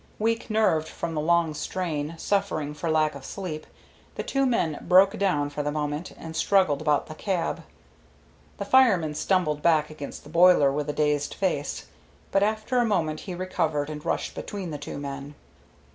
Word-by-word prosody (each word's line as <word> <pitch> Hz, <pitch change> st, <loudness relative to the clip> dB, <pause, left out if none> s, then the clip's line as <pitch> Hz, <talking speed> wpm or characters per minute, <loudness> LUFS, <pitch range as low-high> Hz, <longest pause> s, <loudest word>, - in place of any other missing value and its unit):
Weak 225 Hz, +2 st, -1 dB
nerved 190 Hz, -8 st, +2 dB
from 170 Hz, -1 st, -5 dB
the 155 Hz, -, -1 dB
long 170 Hz, 0 st, +2 dB
strain, 160 Hz, -2 st, -3 dB
suffering 190 Hz, -7 st, -1 dB
for 155 Hz, +3 st, -4 dB
lack 155 Hz, -1 st, +2 dB
of 140 Hz, -1 st, -10 dB
sleep, 155 Hz, -2 st, -6 dB, 0.5 s
the -, -, -3 dB
two 275 Hz, -1 st, +1 dB
men 165 Hz, -, 0 dB
broke 190 Hz, +3 st, +5 dB
down 150 Hz, -8 st, +1 dB
for 145 Hz, -, -3 dB
the 145 Hz, 0 st, -1 dB
moment, 150 Hz, +2 st, -3 dB
and 160 Hz, 0 st, -8 dB
struggled 185 Hz, -4 st, +2 dB
about 150 Hz, -2 st, +2 dB
the 155 Hz, -, -8 dB
cab. 175 Hz, 0 st, -2 dB, 1.0 s
The -, -, -4 dB
fireman 200 Hz, -13 st, +4 dB
stumbled 155 Hz, -3 st, 0 dB
back 155 Hz, -2 st, +3 dB
against 145 Hz, -2 st, -8 dB
the 145 Hz, -, -13 dB
boiler 170 Hz, -4 st, +6 dB
with 150 Hz, +1 st, -2 dB
a -, -, -1 dB
dazed 150 Hz, -1 st, 0 dB
face, 175 Hz, -7 st, -2 dB, 0.5 s
but 195 Hz, -, +3 dB
after 215 Hz, +4 st, +1 dB
a -, -, +4 dB
moment 165 Hz, -9 st, 0 dB
he 185 Hz, -, -6 dB
recovered 155 Hz, -5 st, -1 dB
and 150 Hz, 0 st, -7 dB
rushed -, -, -2 dB
between 195 Hz, -5 st, -6 dB
the 145 Hz, -, -5 dB
two 145 Hz, -, -6 dB
men. 140 Hz, 0 st, -6 dB
160 Hz, 175 wpm, -26 LUFS, 150-190 Hz, 1.0 s, boiler